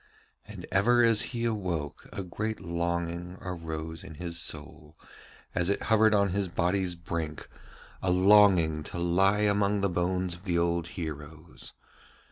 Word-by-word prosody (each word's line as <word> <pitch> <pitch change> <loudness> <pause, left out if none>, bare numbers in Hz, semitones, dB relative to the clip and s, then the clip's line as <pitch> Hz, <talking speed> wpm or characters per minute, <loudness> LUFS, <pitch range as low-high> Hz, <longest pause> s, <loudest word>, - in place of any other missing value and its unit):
And - - -9
ever 120 +6 +4
as 115 -2 +4
he 120 -1 -3
awoke 90 -10 -3
a 100 - -5
great 110 +5 -4
longing 85 0 -3
arose 80 -2 -6
in 80 - -10
his 85 0 -3
soul 75 0 -4 0.6
as 85 +1 0
it 100 - +1
hovered 110 -1 +4
on 100 -1 +3
his 100 +1 -1
body's 90 +1 0
brink, 85 -3 -5 0.5
a 95 - 0
longing 90 -4 +5
to - - -6
lie 95 +4 +2
among 100 -1 +2
the 100 - +1
bones 90 +1 -1
of 85 +3 -12
the 85 -3 0
old 85 0 0
heroes. 75 -2 -7
90 Hz, 145 wpm, -28 LUFS, 85-100 Hz, 0.6 s, longing